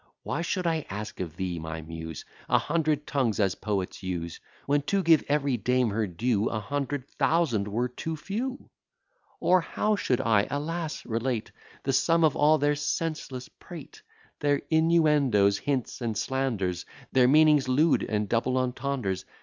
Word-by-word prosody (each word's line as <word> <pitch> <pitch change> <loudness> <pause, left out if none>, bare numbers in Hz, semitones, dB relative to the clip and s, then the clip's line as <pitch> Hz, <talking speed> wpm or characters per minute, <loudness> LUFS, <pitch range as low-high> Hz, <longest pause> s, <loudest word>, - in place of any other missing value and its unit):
Why 165 - -2
should 180 +2 -2
I 160 -3 0
ask 105 +2 -6
of 85 -3 -5
thee, 90 -1 -3
my 80 0 -5
Muse, 80 -1 -7 0.2
A - - +5
hundred 150 -2 0
tongues, 125 -7 0
as 100 -3 +2
poets 100 -3 -3
use, 85 -3 -4 0.3
When, 145 +1 +2
to 195 -1 +2
give 165 -2 +5
every 140 -3 +1
dame 125 0 +1
her 110 +1 0
due, 105 +4 0
A 110 - -2
hundred 140 +4 -3
thousand 145 -15 +1
were 115 +4 -1
too 160 +6 -5
few? 245 - -5 0.7
Or 185 0 +4
how 210 +6 0
should 130 -11 0
I, 105 -3 +2
alas! 155 +2 -3
relate 115 0 -2 0.3
The 135 - 0
sum 165 +5 +3
of 155 -3 +4
all 155 +1 +4
their 145 0 +2
senseless 150 -3 -3
prate, - - -12 0.4
Their 145 -1 +1
innuendoes, 150 -11 +3
hints, 135 -3 -2
and 115 -3 -2
slanders, 110 -9 -1 0.2
Their 125 -2 +5
meanings 150 0 +5
lewd, 150 +5 +3
and 105 -1 -1
double 120 +4 +1
entendres? 125 -6 -2
130 Hz, 160 wpm, -27 LUFS, 105-155 Hz, 0.7 s, A